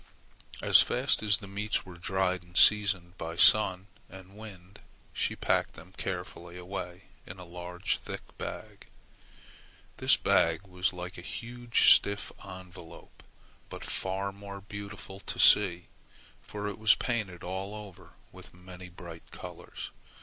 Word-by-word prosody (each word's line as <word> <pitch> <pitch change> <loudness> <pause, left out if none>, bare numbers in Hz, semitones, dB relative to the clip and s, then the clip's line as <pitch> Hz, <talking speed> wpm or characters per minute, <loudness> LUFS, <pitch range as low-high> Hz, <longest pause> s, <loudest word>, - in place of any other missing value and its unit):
As - - +8
fast 125 +2 +1
as 105 -3 +3
the 100 - -10
meats 100 +2 -2
were 90 - -10
dried 95 +1 0
and 90 +1 -7
seasoned 100 -4 +4
by 80 0 -5
sun 95 0 +5 0.2
and 95 +1 -13
wind, 100 -3 -12 0.3
she - - -1
packed - - 0
them 90 - -14
carefully 90 -1 -6
away 90 0 -6 0.2
in 90 - -8
a 90 - -10
large 90 +1 -3
thick - - -9
bag. - - -7 1.1
This - - +4
bag 80 +2 +2
was 90 0 -1
like 90 -1 -7
a - - -8
huge 120 +5 +2
stiff 100 0 +3
envelope, 90 -2 -12 0.5
but - - -8
far 95 +1 -2
more 100 0 -9
beautiful 100 0 -8
to - - -6
see, 90 -4 +5 0.6
for 105 -1 -6
it 105 - -5
was 110 0 +6
painted 110 -8 -3
all 95 +3 -4
over 105 -4 -11 0.2
with - - -14
many 90 0 -11
bright 85 -2 -11
colors. - - -9
95 Hz, 140 wpm, -30 LUFS, 90-100 Hz, 1.1 s, As